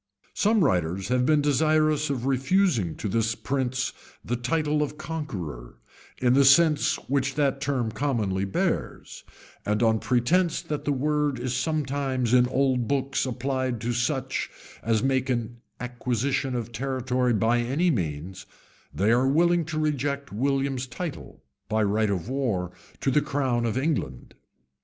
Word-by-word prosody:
Some 215 -2 +3
writers 90 - 0
have 125 0 +2
been 155 -2 +3
desirous 155 +1 +2
of 130 -3 -2
refusing 135 - +1
to - - -4
this 115 +2 0
prince 130 -1 -2 0.3
the 120 - -1
title 150 +4 0
of 150 0 -3
conqueror, 90 - -6 0.4
in 125 -1 +2
the 140 +1 +5
sense 150 +3 +5
which 135 0 0
that 140 -2 +1
term 130 -6 -1
commonly 110 -9 -1
bears; 95 -1 -2 0.4
and 105 +2 0
on 110 -1 +3
pretence 160 +10 +1
that 150 -1 -4
the 145 - +1
word 145 0 0
is 130 -1 -2
sometimes 135 -3 -1
in 125 -1 +5
old 130 -2 +1
books 135 -1 0
applied 130 -1 -2
to 120 +1 -1
such 130 +2 -1 0.3
as 110 -1 +1
make 130 -1 +1
an 120 -1 -2 0.2
acquisition 125 +2 -2
of 120 -1 -4
territory 125 0 -1
by 115 +3 +2
any 140 +9 +1
means, 85 - -4 0.4
they 105 +3 +1
are 125 +3 +3
willing 170 +4 +3
to 155 0 -4
reject 140 -4 -1
William's 135 +2 0
title, 155 +5 -7 0.3
by 110 0 +1
right 105 +1 +1
of 95 -1 -2
war, 115 -10 -1 0.3
to 135 - +1
the 150 - +3
crown 135 -5 0
of 115 - -2
England. 130 - -2
130 Hz, 145 wpm, -26 LUFS, 115-145 Hz, 0.4 s, the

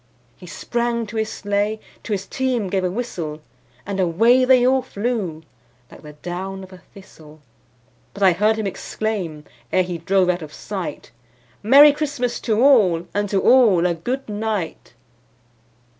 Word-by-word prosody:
He 180 - -14
sprang 235 +4 -2
to 215 +1 -10
his 220 -1 -1
sleigh, 205 +1 -2 0.2
to - - -8
his 200 -1 -2
team 250 -6 -2
gave 190 -1 0
a 180 - 0
whistle, 175 -8 -5 0.5
And 195 -1 -4
away 225 +9 +3
they 255 -1 +5
all 260 +1 +3
flew 205 -9 -3 0.5
like - - -14
the 150 -1 -12
down 185 +5 -6
of 190 0 -13
a 185 - -13
thistle; 155 -7 -17 0.8
But 200 - -3
I 190 - +7
heard 210 +5 +2
him 220 -1 -3
exclaim, 190 -5 -4 0.3
ere 185 - +3
he 175 -2 -5
drove 185 +2 +2
out 180 0 0
of 155 -1 -9
sight, 195 -4 -6 0.5
"Merry 280 +7 +8
Christmas 285 -5 -2
to 225 +1 0
all, 195 -12 +4
and 205 0 -1
to 195 -1 +1
all 220 -9 +5
a 175 - +2
good 245 +11 -4
night!" 210 -5 -4
200 Hz, 160 wpm, -21 LUFS, 180-235 Hz, 0.8 s, Merry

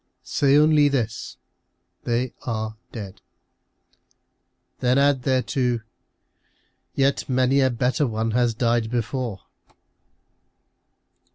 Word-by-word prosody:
Say 140 0 +2
only 150 -1 +5
this, 115 -5 -3 0.3
" - - -50
They 120 +1 -1
are 110 -2 -4 0.2
dead." 100 -5 -8 1.6
Then 125 +1 +2
add 140 -1 +3
thereto, 125 -2 0 0.5
" - - -42 0.3
Yet 135 0 +1
many 130 +2 +3
a 130 - +3
better 130 +4 0
one 110 0 -2
has 120 0 +1
died 115 -1 +1
before." 120 -2 -3
125 Hz, 100 wpm, -23 LUFS, 115-135 Hz, 1.6 s, only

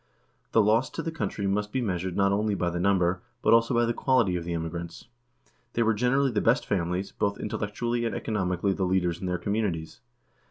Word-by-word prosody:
The 110 - +5
loss 110 +5 +3
to - - -2
the 165 - -3
country 135 -10 -3
must 105 +2 0
be 130 - -1
measured 90 -5 -2
not 100 0 +3
only 105 +1 +1
by 90 -2 -1
the 85 - -3
number, 90 -1 +2 0.2
but - - +5
also 115 +2 +4
by 120 0 +3
the 115 - 0
quality 120 -10 +2
of 85 - -2
the 85 0 -3
emigrants. 85 +1 -5 0.7
They 115 - +2
were 115 0 +3
generally 125 +5 +2
the 105 -3 0
best 120 +5 +2
families, 90 0 -1
both 100 0 -1
intellectually 120 +3 -2
and 110 -4 -2
economi 90 -5 -1
cally 100 -1 +2
the 95 - -2
leaders 90 -2 0
in 95 - -4
their 90 0 0
communities. 90 - -2
100 Hz, 210 wpm, -27 LUFS, 90-115 Hz, 0.7 s, The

